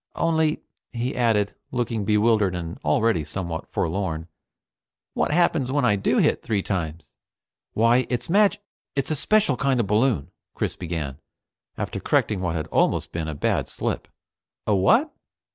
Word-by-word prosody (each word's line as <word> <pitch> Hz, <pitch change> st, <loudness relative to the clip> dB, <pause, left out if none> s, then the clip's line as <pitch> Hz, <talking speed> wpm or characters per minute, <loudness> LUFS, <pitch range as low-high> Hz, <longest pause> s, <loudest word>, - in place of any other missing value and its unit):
"Only," 160 Hz, -2 st, +1 dB, 0.3 s
he 120 Hz, +1 st, -3 dB
added, 110 Hz, -4 st, +2 dB, 0.2 s
looking 115 Hz, -4 st, -2 dB
bewildered 105 Hz, -2 st, +3 dB
and 85 Hz, -1 st, -5 dB
already 85 Hz, +3 st, +2 dB
somewhat 85 Hz, +1 st, -5 dB
forlorn, 85 Hz, -2 st, -2 dB, 0.8 s
"what -, -, 0 dB
happens 155 Hz, -5 st, +2 dB
when 140 Hz, -2 st, +2 dB
I 105 Hz, -, +4 dB
do 100 Hz, -, +1 dB
hit -, -, +3 dB
three 105 Hz, -3 st, -1 dB
times?" 85 Hz, -5 st, -4 dB, 0.6 s
"Why, 115 Hz, +3 st, +3 dB
it's 125 Hz, -1 st, -2 dB
a -, -, -5 dB
mag 205 Hz, +1 st, +4 dB, 0.4 s
it's 140 Hz, +2 st, -1 dB
a -, -, +1 dB
special 195 Hz, -1 st, +2 dB
kind 135 Hz, -1 st, +1 dB
of 120 Hz, -, +2 dB
balloon," 105 Hz, -, +1 dB, 0.2 s
Chris -, -, -2 dB
began, 80 Hz, -6 st, -4 dB, 0.6 s
after -, -, -3 dB
correcting 100 Hz, -4 st, +1 dB
what 85 Hz, -2 st, -1 dB
had 80 Hz, -1 st, -2 dB
almost -, -, +1 dB
been 80 Hz, -2 st, -3 dB
a 80 Hz, -, -4 dB
bad -, -, 0 dB
slip. -, -, -3 dB, 0.6 s
"A 105 Hz, -, +2 dB
what?" 225 Hz, -, +3 dB
105 Hz, 155 wpm, -24 LUFS, 85-130 Hz, 0.8 s, I